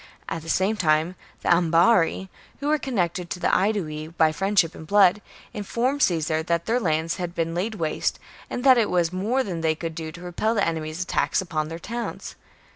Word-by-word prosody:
At 165 Hz, -, -4 dB
the 165 Hz, -, -9 dB
same 195 Hz, +6 st, +1 dB
time 160 Hz, -1 st, +2 dB, 0.3 s
the -, -, -1 dB
Ambarri, 170 Hz, +2 st, +3 dB, 0.3 s
who 285 Hz, +1 st, -2 dB
were 305 Hz, 0 st, +2 dB
connected 180 Hz, -9 st, -2 dB
with 180 Hz, -, -3 dB
the -, -, +3 dB
Aedui 170 Hz, -7 st, -1 dB
by 160 Hz, -1 st, +2 dB
friendship 195 Hz, +1 st, +1 dB
and 160 Hz, -, -11 dB
blood, 200 Hz, +1 st, +5 dB, 0.3 s
informed 245 Hz, +6 st, -1 dB
Caesar 160 Hz, -, +1 dB
that 170 Hz, 0 st, -1 dB
their 235 Hz, +2 st, +1 dB
lands 160 Hz, -4 st, 0 dB
had 175 Hz, -1 st, -4 dB
been 165 Hz, 0 st, -1 dB
laid 200 Hz, +6 st, -2 dB
waste, 160 Hz, -6 st, -1 dB, 0.3 s
and 245 Hz, -, -4 dB
that 260 Hz, -3 st, +7 dB
it 220 Hz, -, +1 dB
was 175 Hz, -1 st, +1 dB
more 225 Hz, +8 st, 0 dB
than 175 Hz, -7 st, -4 dB
they 160 Hz, -1 st, +1 dB
could 165 Hz, 0 st, -5 dB
do 160 Hz, -1 st, -6 dB
to 175 Hz, -, -11 dB
repel 180 Hz, +6 st, -1 dB
the 205 Hz, -, +2 dB
enemy's 160 Hz, +1 st, -3 dB
attacks -, -, 0 dB
upon 155 Hz, -4 st, -2 dB
their 165 Hz, +1 st, -6 dB
towns. 235 Hz, +7 st, -6 dB
175 Hz, 200 wpm, -24 LUFS, 165-210 Hz, 0.3 s, that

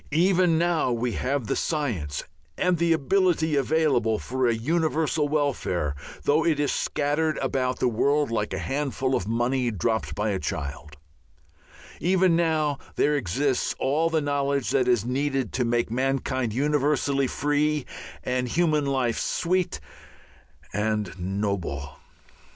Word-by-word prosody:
Even 175 Hz, 0 st, +3 dB
now 170 Hz, -5 st, +1 dB
we 120 Hz, +1 st, -1 dB
have 130 Hz, +2 st, -1 dB
the -, -, -1 dB
science 110 Hz, -, -2 dB, 0.3 s
and 180 Hz, -2 st, +1 dB
the 170 Hz, 0 st, +2 dB
ability 165 Hz, 0 st, +2 dB
available 135 Hz, -6 st, +2 dB
for 130 Hz, +2 st, -1 dB
a 120 Hz, -, +3 dB
universal 155 Hz, +3 st, 0 dB
welfare, 125 Hz, -, 0 dB, 0.3 s
though 150 Hz, +3 st, +3 dB
it 160 Hz, -3 st, +1 dB
is 145 Hz, -, +1 dB
scattered 150 Hz, +2 st, 0 dB
about 130 Hz, -1 st, -1 dB
the -, -, +1 dB
world 140 Hz, +4 st, +1 dB
like 105 Hz, -2 st, -1 dB
a -, -, -2 dB
handful 135 Hz, -1 st, -2 dB
of 95 Hz, -6 st, 0 dB
money 120 Hz, +2 st, +1 dB
dropped 110 Hz, +2 st, -1 dB
by 105 Hz, +1 st, -1 dB
a 95 Hz, -, -1 dB
child; 75 Hz, -4 st, -5 dB, 1.0 s
even 185 Hz, -1 st, +3 dB
now 155 Hz, -4 st, +1 dB, 0.2 s
there 150 Hz, +1 st, +2 dB
exists 135 Hz, +3 st, 0 dB
all 155 Hz, +5 st, +1 dB
the 160 Hz, -1 st, +1 dB
knowledge 140 Hz, -2 st, 0 dB
that 125 Hz, -, +2 dB
is 120 Hz, -4 st, +2 dB
needed 135 Hz, +1 st, -1 dB
to 130 Hz, -, +1 dB
make 120 Hz, -1 st, 0 dB
mankind 130 Hz, -1 st, 0 dB
universally 140 Hz, +1 st, +1 dB
free 150 Hz, +1 st, 0 dB, 0.4 s
and 125 Hz, 0 st, -1 dB
human 155 Hz, 0 st, +1 dB
life 130 Hz, -4 st, 0 dB
sweet 180 Hz, +1 st, 0 dB, 0.9 s
and 105 Hz, -2 st, -1 dB
noble. 90 Hz, -6 st, -3 dB
135 Hz, 135 wpm, -25 LUFS, 115-155 Hz, 1.0 s, Even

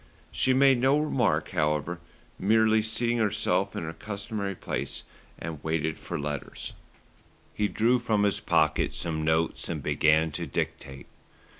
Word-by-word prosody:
She 130 Hz, -, +2 dB
made 135 Hz, -1 st, +5 dB
no 135 Hz, +3 st, +4 dB
remark, 125 Hz, -, +1 dB
however, 75 Hz, +1 st, 0 dB, 0.4 s
merely 110 Hz, +2 st, +4 dB
seating 115 Hz, +2 st, 0 dB
herself 105 Hz, -1 st, +1 dB
in -, -, -3 dB
her 80 Hz, 0 st, -5 dB
customary 100 Hz, 0 st, -4 dB
place -, -, -4 dB, 0.3 s
and 80 Hz, -3 st, -7 dB
waited 80 Hz, 0 st, -1 dB
for 85 Hz, -, -5 dB
letters. 75 Hz, -1 st, -5 dB, 0.8 s
He 105 Hz, -, +1 dB
drew 120 Hz, +4 st, +2 dB
from 110 Hz, -3 st, +1 dB
his 100 Hz, -1 st, +1 dB
pocket -, -, +1 dB
some 80 Hz, -2 st, -2 dB
notes 80 Hz, +1 st, 0 dB
and -, -, -3 dB
began 80 Hz, +1 st, +3 dB
to -, -, -4 dB
dictate. 65 Hz, -1 st, -4 dB
100 Hz, 140 wpm, -27 LUFS, 80-110 Hz, 0.8 s, made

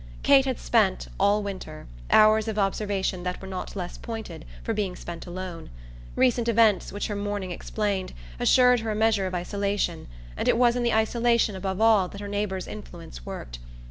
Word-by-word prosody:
Kate 270 Hz, -1 st, +6 dB
had 260 Hz, -2 st, -1 dB
spent, 210 Hz, -5 st, +1 dB
all 205 Hz, +2 st, +3 dB
winter, 185 Hz, -6 st, -7 dB, 0.2 s
hours 215 Hz, +1 st, +5 dB
of 220 Hz, -1 st, -3 dB
observation 195 Hz, -2 st, -1 dB
that 180 Hz, 0 st, -3 dB
were 190 Hz, -, -9 dB
not 190 Hz, +1 st, -6 dB
less 180 Hz, -3 st, -5 dB
pointed 225 Hz, -, -7 dB, 0.2 s
for -, -, -1 dB
being 195 Hz, -4 st, -2 dB
spent 170 Hz, +1 st, -8 dB
alone; 175 Hz, -1 st, -7 dB, 0.5 s
recent 245 Hz, -2 st, +2 dB
events, 225 Hz, -3 st, +3 dB
which 205 Hz, -, -3 dB
her 210 Hz, -, -3 dB
mourning 200 Hz, -2 st, -3 dB
explained, 200 Hz, +1 st, -2 dB, 0.3 s
assured 250 Hz, -1 st, +5 dB
her 225 Hz, 0 st, -4 dB
a 215 Hz, -, -1 dB
measure 215 Hz, -3 st, +2 dB
of 185 Hz, -, -4 dB
isolation, 200 Hz, -1 st, -2 dB, 0.3 s
and -, -, -3 dB
it -, -, +4 dB
was 240 Hz, -1 st, +4 dB
in 245 Hz, -, 0 dB
the 240 Hz, -1 st, +1 dB
isolation 230 Hz, -1 st, +2 dB
above 190 Hz, 0 st, -3 dB
all 220 Hz, -4 st, +4 dB
that 200 Hz, -, -10 dB
her 205 Hz, -, -6 dB
neighbour's 200 Hz, -2 st, -2 dB
influence -, -, -10 dB
worked. -, -, -7 dB
205 Hz, 180 wpm, -26 LUFS, 185-220 Hz, 0.5 s, Kate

